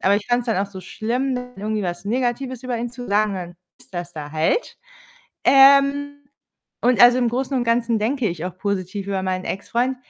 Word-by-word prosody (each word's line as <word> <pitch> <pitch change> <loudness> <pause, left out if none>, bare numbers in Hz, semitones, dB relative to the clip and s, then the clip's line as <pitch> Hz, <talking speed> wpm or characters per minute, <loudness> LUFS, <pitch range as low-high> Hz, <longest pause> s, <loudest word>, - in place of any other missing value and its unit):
aber 200 +1 +3
ich 205 - -5
fand's 245 0 0
dann 225 -5 0
auch 195 +1 -1
so 190 - -8
schlimm, 245 +8 -2 0.2
irgendwie 215 +1 -2
was 175 0 -4
Negatives 250 +3 -2
über 250 -2 -3
ihn 240 0 -3
zu 245 0 -8
sagen, 210 +1 +2
und - - -4
dann 175 -1 -7 0.2
ist - - -17
das 175 0 -5
da 150 -2 -8
halt. 160 - 0 0.7
Ähm, 280 +1 +5 0.6
und 245 0 +3
also 245 +1 +8
im 245 -2 +2
Großen 260 +3 -2
und 245 - 0
Ganzen 230 -1 +1
denke 240 +2 0
ich 170 -1 -5
auch 180 0 -5
positiv 195 0 -3
über 195 -1 -2
meinen 185 0 -2
Ex-Freund, 240 +6 -2
230 Hz, 200 wpm, -22 LUFS, 190-255 Hz, 0.7 s, also